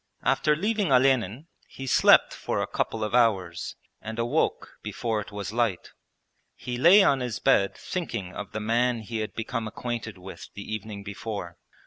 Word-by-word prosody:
After 150 Hz, -1 st, +3 dB
leaving 205 Hz, +1 st, 0 dB
Olenin 130 Hz, -, +3 dB, 0.2 s
he 135 Hz, -, -8 dB
slept 130 Hz, -, +5 dB
for -, -, -3 dB
a -, -, 0 dB
couple 110 Hz, -1 st, -2 dB
of 105 Hz, -, -3 dB
hours 95 Hz, -8 st, +1 dB, 0.3 s
and 110 Hz, +1 st, -6 dB
awoke 120 Hz, +7 st, -1 dB
before 110 Hz, -3 st, -2 dB
it 105 Hz, -, -10 dB
was 100 Hz, 0 st, -5 dB
light. 115 Hz, -6 st, -1 dB, 0.6 s
He 125 Hz, -, -5 dB
lay 190 Hz, +8 st, +8 dB
on 135 Hz, -, +3 dB
his 125 Hz, -5 st, -3 dB
bed 100 Hz, 0 st, +3 dB
thinking 115 Hz, -, -4 dB
of 105 Hz, -, -7 dB
the 110 Hz, -, -3 dB
man 115 Hz, +2 st, +1 dB
he 110 Hz, +1 st, -5 dB
had 110 Hz, 0 st, -4 dB
become 115 Hz, 0 st, -3 dB
acquainted 115 Hz, -2 st, -5 dB
with 95 Hz, +1 st, -10 dB
the 100 Hz, -, -6 dB
evening 105 Hz, -1 st, -6 dB
before. 100 Hz, -3 st, -6 dB
115 Hz, 165 wpm, -26 LUFS, 105-125 Hz, 0.6 s, lay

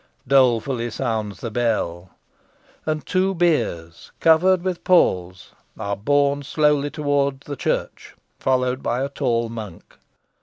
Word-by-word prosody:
Dolefully 125 Hz, -2 st, +2 dB
sounds 110 Hz, -4 st, -3 dB
the 115 Hz, -, -4 dB
bell. 105 Hz, -7 st, -1 dB, 0.8 s
And 155 Hz, -1 st, -2 dB
two 190 Hz, +1 st, +1 dB
biers, 115 Hz, -, -1 dB
covered 175 Hz, +3 st, +4 dB
with 185 Hz, -2 st, -3 dB
palls, 90 Hz, -, +2 dB, 0.3 s
are 100 Hz, 0 st, -3 dB
borne 140 Hz, +6 st, +1 dB
slowly 145 Hz, 0 st, +1 dB
towards 140 Hz, -2 st, -1 dB
the 145 Hz, -, -5 dB
church, -, -, -3 dB, 0.2 s
followed 130 Hz, 0 st, 0 dB
by 125 Hz, +2 st, -1 dB
a 140 Hz, -, -2 dB
tall 120 Hz, -5 st, -1 dB
monk. 110 Hz, -6 st, -9 dB
135 Hz, 120 wpm, -22 LUFS, 115-150 Hz, 0.8 s, covered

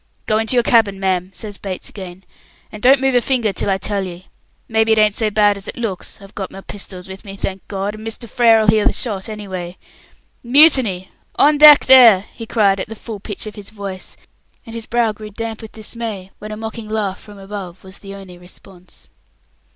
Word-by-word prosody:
"Go 215 Hz, 0 st, +1 dB
into 225 Hz, +3 st, +1 dB
your 240 Hz, -, +4 dB
cabin, 220 Hz, -5 st, +3 dB
ma'am," 185 Hz, -1 st, -1 dB
says 205 Hz, -3 st, -8 dB
Bates 190 Hz, -2 st, -6 dB
again, 190 Hz, -2 st, -10 dB, 0.5 s
"and 210 Hz, -, -10 dB
don't 265 Hz, +3 st, +6 dB
move 270 Hz, 0 st, +1 dB
a 245 Hz, -, +4 dB
finger 235 Hz, -5 st, 0 dB
till -, -, -2 dB
I 190 Hz, -, +2 dB
tell 200 Hz, +1 st, -3 dB
ye. 185 Hz, 0 st, -9 dB, 0.4 s
Maybe 220 Hz, 0 st, +2 dB
it -, -, +1 dB
ain't 215 Hz, -1 st, +4 dB
so 220 Hz, -2 st, 0 dB
bad 205 Hz, -1 st, +3 dB
as 200 Hz, +1 st, -9 dB
it -, -, -7 dB
looks; 225 Hz, -6 st, -4 dB
I've 195 Hz, 0 st, -15 dB
got 195 Hz, -2 st, -5 dB
my 195 Hz, -, -10 dB
pistols 190 Hz, -2 st, -7 dB
with 190 Hz, +1 st, -10 dB
me, 195 Hz, -1 st, -9 dB
thank 195 Hz, -1 st, -5 dB
God, 200 Hz, +1 st, -3 dB
and 215 Hz, +1 st, -9 dB
Mr. 225 Hz, +2 st, -6 dB
Frere'll 225 Hz, -1 st, +4 dB
hear 215 Hz, 0 st, +3 dB
the -, -, +2 dB
shot 205 Hz, -5 st, -3 dB
anyway. 190 Hz, -4 st, -6 dB, 0.7 s
Mutiny? 245 Hz, -, +4 dB, 0.2 s
On 295 Hz, 0 st, +4 dB
deck 300 Hz, -1 st, +9 dB
there!" 235 Hz, -7 st, +7 dB
he 225 Hz, -, -9 dB
cried 200 Hz, -4 st, +2 dB
at 190 Hz, -, -5 dB
the 225 Hz, -, -7 dB
full 220 Hz, -1 st, -8 dB
pitch 205 Hz, +1 st, -6 dB
of 215 Hz, -, -7 dB
his 205 Hz, -1 st, -9 dB
voice, 200 Hz, -3 st, -8 dB, 0.5 s
and 225 Hz, -, -10 dB
his 230 Hz, -1 st, -7 dB
brow 235 Hz, -1 st, +1 dB
grew 215 Hz, 0 st, -10 dB
damp 225 Hz, +1 st, -6 dB
with 220 Hz, -, -11 dB
dismay 215 Hz, -3 st, -6 dB
when 215 Hz, +1 st, -8 dB
a 215 Hz, -, -6 dB
mocking 220 Hz, 0 st, -7 dB
laugh 210 Hz, -3 st, -2 dB
from 205 Hz, -1 st, -14 dB
above 195 Hz, -2 st, -8 dB
was 190 Hz, 0 st, -13 dB
the 195 Hz, -1 st, -10 dB
only 185 Hz, -3 st, -12 dB
response. 180 Hz, 0 st, -15 dB
210 Hz, 215 wpm, -18 LUFS, 195-225 Hz, 0.7 s, deck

